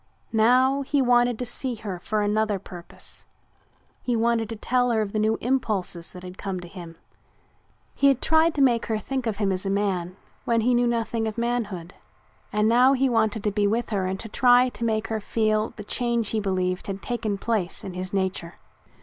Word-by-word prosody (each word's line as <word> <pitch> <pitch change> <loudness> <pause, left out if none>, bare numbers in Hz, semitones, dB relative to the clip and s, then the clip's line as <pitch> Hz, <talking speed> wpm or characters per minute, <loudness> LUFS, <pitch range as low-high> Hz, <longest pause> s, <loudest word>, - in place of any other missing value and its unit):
Now 255 +5 +4
he 280 +1 0
wanted 245 -2 +3
to 250 - -3
see 245 +1 -2
her 200 -5 -6
for 215 +3 -1
another 210 0 +1
purpose. 175 -2 -8 0.7
He 245 - -1
wanted 230 -1 +1
to 225 - -4
tell 245 +3 +1
her 230 -2 +2
of 200 - -6
the 215 - 0
new 220 +1 +2
impulses 210 -9 -1
that 180 -1 -11
had 180 +1 -10
come 195 -2 -3
to 175 - -9
him. 170 -2 -10 1.0
He 280 - +3
had 270 -2 +4
tried 320 +2 +3
to 280 - +3
make 240 -3 +2
her 220 - 0
think 260 +3 -3
of 215 -3 -2
him 200 -2 +1
as 185 0 -1
a 195 - -2
man 190 -3 -1 0.3
when 230 -1 +1
he 245 +3 +2
knew 240 0 +3
nothing 230 -1 -1
of 220 0 -5
manhood 220 -7 -2 0.6
and 210 +1 +2
now 250 +4 +5
he 270 0 +2
wanted 220 -2 +1
to 210 - +1
be 205 0 +1
with 230 +3 -1
her 195 -3 0
and 190 +1 -3
to 225 - -7
try 250 +2 +4
to 235 - -8
make 220 -1 0
her 220 -1 -1
feel 215 0 0
the 210 - -8
change 235 0 0
he 220 - 0
believed 185 -2 -1
had 195 -1 -5
taken 220 -4 -2
place 205 -4 -2
in 190 - -6
his 185 +1 -5
nature. 190 -3 -2
220 Hz, 210 wpm, -25 LUFS, 195-240 Hz, 1.0 s, now